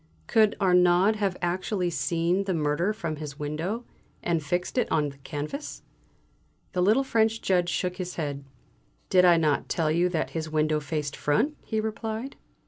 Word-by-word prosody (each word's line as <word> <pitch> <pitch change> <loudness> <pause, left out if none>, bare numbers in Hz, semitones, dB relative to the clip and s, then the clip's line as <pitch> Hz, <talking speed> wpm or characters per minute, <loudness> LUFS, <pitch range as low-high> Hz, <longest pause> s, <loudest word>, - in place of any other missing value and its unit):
"Could 215 -2 +3
Arnaud 180 +2 +4
have 195 -3 -1
actually 180 +1 -1
seen 170 +6 0
the 190 -2 0
murder 155 +5 +1
from 170 -8 -4
his 145 -2 -7
window, 165 +11 -3 0.4
and 170 -2 +1
fixed 175 - -1
it - - -1
on 150 -2 +2
the 140 - -13
canvas?" 150 - -6 0.9
The 180 - 0
little 215 +9 +4
French 225 -3 +2
Judge 180 -4 +1
shook 180 +1 -1
his 180 -1 -5
head. 145 -3 -3 0.7
"Did 180 -1 +6
I 175 -1 +6
not 155 -3 +1
tell 160 -2 +1
you 175 +3 +2
that 165 -3 -2
his 160 -1 -4
window 155 0 +1
faced 150 -1 -3
front?" 215 - +1
he 220 - -2
replied. 220 +4 -4
175 Hz, 165 wpm, -27 LUFS, 155-200 Hz, 0.9 s, Did